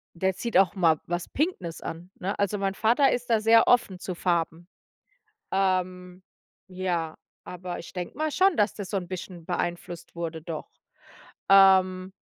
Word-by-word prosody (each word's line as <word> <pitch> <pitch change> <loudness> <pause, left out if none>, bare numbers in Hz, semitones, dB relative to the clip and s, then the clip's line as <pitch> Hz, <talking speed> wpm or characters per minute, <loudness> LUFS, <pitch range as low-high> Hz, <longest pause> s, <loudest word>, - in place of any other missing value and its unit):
.Der 190 +2 0
zieht 235 +4 0
auch 195 0 +4
mal 165 -5 +3
was 175 0 -3
pinkes 265 - -2
an, 165 +2 -7
ne? 195 +3 -3
Also, 205 0 0
mein 195 0 -1
Vater 240 +7 +3
ist 245 0 -3
da 225 -2 +4
sehr 225 +1 +5
offen 235 -7 +3
zu 185 0 -5
Farben. 170 -1 -1 0.9
Ähm, 185 -1 -1 0.5
ja, 180 -4 -2 0.3
aber 180 0 -6
ich - - -10
denke 180 -1 -6
mal 310 0 -1
schon, 375 +2 +3
dass 210 0 +2
das 200 -3 -6
so 205 - -1
'n 185 -2 -3
bisschen 180 -2 -7
beeinflusst 175 -1 -4
wurde, 165 -1 -4
doch. 160 -1 -6 0.8
Ähm 190 -1 +5
185 Hz, 160 wpm, -26 LUFS, 175-200 Hz, 0.9 s, sehr